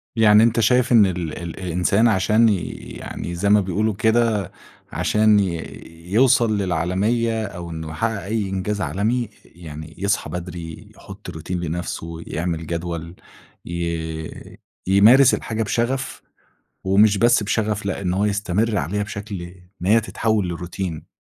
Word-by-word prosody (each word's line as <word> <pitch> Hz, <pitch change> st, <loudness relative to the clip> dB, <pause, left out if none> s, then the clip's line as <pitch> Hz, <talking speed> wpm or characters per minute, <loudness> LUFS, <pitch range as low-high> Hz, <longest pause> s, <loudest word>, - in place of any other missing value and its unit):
يعني 110 Hz, -1 st, +6 dB
أنت 115 Hz, 0 st, +2 dB
شايف 125 Hz, +3 st, +3 dB
إن 115 Hz, -4 st, +7 dB
ال 90 Hz, -4 st, -3 dB
الإنسان 90 Hz, +5 st, 0 dB
عشان 110 Hz, +2 st, +3 dB
ي 95 Hz, -4 st, 0 dB, 0.3 s
يعني، 85 Hz, -, -6 dB
زَي 100 Hz, +4 st, 0 dB
ما 105 Hz, 0 st, +6 dB
بيقولوا 105 Hz, +4 st, 0 dB
كده، 110 Hz, -2 st, +1 dB, 0.4 s
عشان 105 Hz, -1 st, +3 dB
ي 85 Hz, -4 st, -1 dB, 0.5 s
يوصَل 115 Hz, -2 st, +4 dB
للعالمية 100 Hz, +6 st, 0 dB
أو 90 Hz, -4 st, -7 dB
إنّه 80 Hz, -1 st, -6 dB
يحقق 105 Hz, +6 st, -2 dB
أي 105 Hz, -1 st, -2 dB
إنجاز 100 Hz, +2 st, -2 dB
عالمي، 110 Hz, +7 st, 0 dB
ي 110 Hz, -, -10 dB, 0.3 s
يعني 80 Hz, -2 st, -9 dB
يصحى 100 Hz, +2 st, -1 dB
بدري، 85 Hz, -2 st, -7 dB
يحط 95 Hz, -1 st, -11 dB
روتين 90 Hz, +1 st, -5 dB
لنفْسه، 85 Hz, -1 st, -5 dB
يعمل 85 Hz, -1 st, -3 dB
جدول، 85 Hz, 0 st, -4 dB, 0.5 s
ي 80 Hz, -2 st, -5 dB, 0.3 s
يمارس 115 Hz, +8 st, +6 dB
الحاجة 110 Hz, 0 st, -2 dB
بشغف 120 Hz, +5 st, -2 dB, 0.6 s
ومش 100 Hz, +2 st, +4 dB
بس 120 Hz, +1 st, +4 dB
بشغف، 105 Hz, -1 st, -1 dB
لأ، 100 Hz, 0 st, -2 dB
إن 90 Hz, -2 st, -1 dB
هو 100 Hz, +3 st, +1 dB
يستمر 105 Hz, +1 st, 0 dB
عليها 100 Hz, +6 st, -1 dB
بشكل 100 Hz, -2 st, -6 dB
إن 90 Hz, +1 st, -11 dB
هي 110 Hz, +2 st, +5 dB
تتحول 110 Hz, -2 st, -1 dB
للروتين. 85 Hz, -1 st, -5 dB
100 Hz, 140 wpm, -21 LUFS, 85-110 Hz, 0.6 s, إن